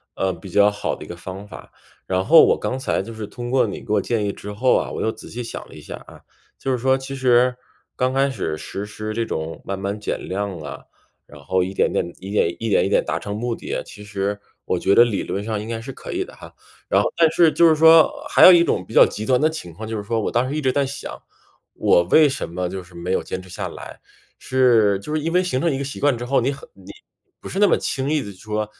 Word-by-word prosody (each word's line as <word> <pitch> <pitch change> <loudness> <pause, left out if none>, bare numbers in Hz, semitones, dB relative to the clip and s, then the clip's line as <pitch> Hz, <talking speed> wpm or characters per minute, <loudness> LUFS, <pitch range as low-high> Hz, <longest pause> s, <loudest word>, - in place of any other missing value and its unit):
呃， 95 -1 0
比 95 +3 -11
较 100 +3 +5
好 105 0 -3
的 - - -10
一 - - -14
个 85 - -7
方 95 +4 -9
法。 - - -12 0.4
然 95 0 0
后 165 +2 +8
我 - - +3
刚 130 - -3
才 130 - -1
就 115 - -9
是 110 -2 -6
通 120 +3 -7
过 130 -4 +3
你 100 - -6
给 105 - -3
我 105 - +3
建 110 +1 -1
议 100 - -1
之 105 - -9
后 125 +5 +2
啊， - - -1
我 - - -4
又 110 - 0
仔 - - -12
细 120 +1 -5
想 - - -7
了 - - -13
一 - - -11
下 - - -8
啊。 - - -14 0.4
就 135 - -3
是 125 - +1
说 130 +2 +2
其 135 +1 -7
实， 125 -1 +3 0.4
刚 130 +1 0
开 135 +1 +2
始 80 -10 -3
实 100 - -6
施 110 +1 -6
这 115 +1 -1
种 80 -5 -5
慢 100 - -4
慢 100 +2 -4
减 105 - -4
量 95 -2 -3
啊， 75 -2 -8 0.5
然 75 - -14
后 95 +5 +1
一 95 - -4
点 - - +1
点 85 - -1
一 95 +2 -8
点， 95 -5 +2
一 115 - -3 0.2
点 - - +3
达 - - -2
成 100 0 -5
目 120 +1 -2
的 - - -8
啊， - - -3
其 105 - -12
实 100 0 -3 0.3
我 90 - -1
觉 100 - +2
得 120 - +8
理 105 -5 -2
论 100 - -4
上 110 -1 -3
应 110 - -7
该 115 -1 -3
是 130 +4 -7
可 - - -9
以 370 +1 -1
的 - - -14
哈。 - - -13 0.4
然 - - +4
后 - - -2
但 165 -1 +4
是 165 -2 +4
就 170 +1 +5
是 155 - +4
说 160 - +7 0.2
还 - - +6
有 - - +11
一 170 -1 +6
种 - - 0
比 - - -12
较 - - +9
极 105 - -5
端 125 +1 +3
的 155 +1 +3
情 120 - -7
况， 110 +7 -8
就 110 - -4
是 105 - -5
说 115 +2 -1
我 - - -2
当 125 +2 +1
时 145 - -3
一 155 - -1
直 130 -2 +2
在 140 +1 +1
想， 140 +1 -7 0.5
我 - - +3
为 155 - +5
什 135 -9 -4
么 90 +1 -3
就 95 0 -5
是 90 0 -17
没 85 +2 -4
有 - - +1
坚 95 - -5
持 90 - -15
下 - - -5
来， - - -10 0.4
是 115 -6 +3
就 150 +10 -6
是 155 - +1
因 165 +2 -2
为 180 - +4
形 130 -8 -1
成 170 - +1
一 - - -2
个 140 - -3
习 140 - -6
惯 140 -4 +2
之 120 - -6
后， 135 +3 +1
你 130 +3 0
很 135 - -12
你 95 -1 -13 0.5
不 - - -8
是 195 - -3
那 205 - +6
么 - - +3
轻 135 0 -2
易 155 -2 +1
地 100 - -7
说， 105 +3 -4
115 Hz, 300 characters per minute, -21 LUFS, 100-135 Hz, 0.5 s, 有